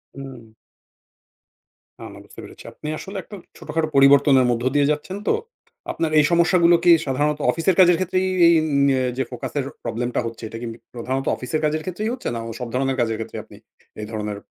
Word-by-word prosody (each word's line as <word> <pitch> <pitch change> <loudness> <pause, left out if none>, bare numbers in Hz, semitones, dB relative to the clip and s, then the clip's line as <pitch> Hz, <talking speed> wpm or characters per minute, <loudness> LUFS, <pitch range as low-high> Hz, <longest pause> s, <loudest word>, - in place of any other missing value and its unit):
হুম। 130 -5 -10 1.5
না, - - -9
না - - -12
বুঝতে - - -15
পেরেছি। - - -13
আপনি 150 - -9
আসলে 195 +1 -8
একটা 205 - -11 0.2
ছোটখাটো 155 +1 -2
পরিবর্তনের 140 -1 +6
মধ্য 120 0 -2
দিয়ে 145 0 +3
যাচ্ছেন 170 +6 -4
তো। - - +3 0.6
আপনার 160 -2 -2
এই 150 - +4
সমস্যাগুলো 170 0 +4
কি, 175 - +6
সাধারণত 145 +3 0
অফিসের 170 +2 0
কাজের 175 -2 +6
ক্ষেত্রেই 185 +1 0 0.2
এই 170 - +6
এন 160 - -2 0.2
ন্য - - +3 0.3
যে 130 - +1
ফোকাসের 130 +3 -4 0.2
প্রবলেমটা 120 +2 -2
হচ্ছে, 115 0 -7
এটা 115 - -8
কি 120 - -5 0.3
প্রধানত 130 +3 -3
অফিসের 130 +5 -3
কাজের 155 +1 0
ক্ষেত্রেই 210 +5 -3
হচ্ছে? 255 - -6
না - - -3 0.2
সব 125 - -4
ধরণের 135 0 0
কাজের 115 -2 -1
ক্ষেত্রে? 115 - -6
আপনি - - -16 0.4
এই - - -5
ধরনের 105 -1 -4
140 Hz, 180 wpm, -22 LUFS, 125-170 Hz, 1.5 s, পরিবর্তনের